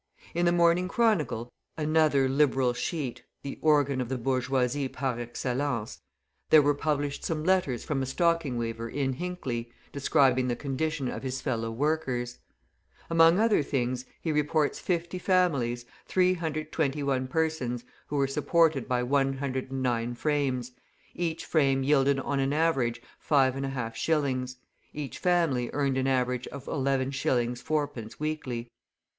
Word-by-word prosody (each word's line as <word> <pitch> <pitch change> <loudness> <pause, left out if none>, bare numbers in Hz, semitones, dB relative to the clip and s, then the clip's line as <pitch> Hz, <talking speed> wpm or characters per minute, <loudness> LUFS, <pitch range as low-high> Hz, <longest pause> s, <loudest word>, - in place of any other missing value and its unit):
In 175 +1 +1
the - - +4
Morning 175 +1 +3
Chronicle, 165 - 0 0.2
another 155 -3 +3
Liberal 130 -2 +2
sheet, 125 -3 -3 0.2
the 140 - -6
organ 145 -4 +3
of 120 - -4
the 130 - -1
bourgeoisie 130 +2 0
par 130 -2 -3
excellence, 120 0 -3 0.5
there 155 -2 +7
were 145 +1 +3
published 145 -1 -2
some 155 -2 -2
letters 175 -9 +1
from 145 -4 -1
a 130 - -2
stocking 165 -3 +1
weaver 115 0 -3
in 135 0 -1
Hinckley, 130 -8 -4 0.2
describing 135 -3 +3
the 120 - 0
condition 145 +1 -2
of - - -4
his 130 0 -3
fellow 115 -5 -2
workers. 125 -2 -1 0.7
Among 165 +1 +6
other 220 -4 +3
things, 130 -2 -2
he 160 - -2
reports 150 0 +1
50 175 0 -2
families, 140 -11 +1 0.2
321 155 -6 0
persons, 130 -6 -1 0.2
who 150 - -4
were 140 -1 +3
supported 150 +1 +2
by 125 -1 +1
109 130 -3 -1
frames; 130 -3 -1 0.4
each 170 -2 -3
frame 135 -4 +2
yielded 140 -1 +3
on 140 +1 -1
an 135 +1 +1
average 135 -7 +1 0.2
5.5 135 -4 +1
shillings; 130 -4 -1 0.4
each 140 -4 -6
family 165 -9 +1
earned 140 -2 +1
an 130 - 0
average 125 -1 0
of 140 -1 -9
11s. 135 -3 0
4d. 145 -8 -3
weekly. 140 -6 -3
135 Hz, 130 wpm, -28 LUFS, 125-155 Hz, 0.7 s, there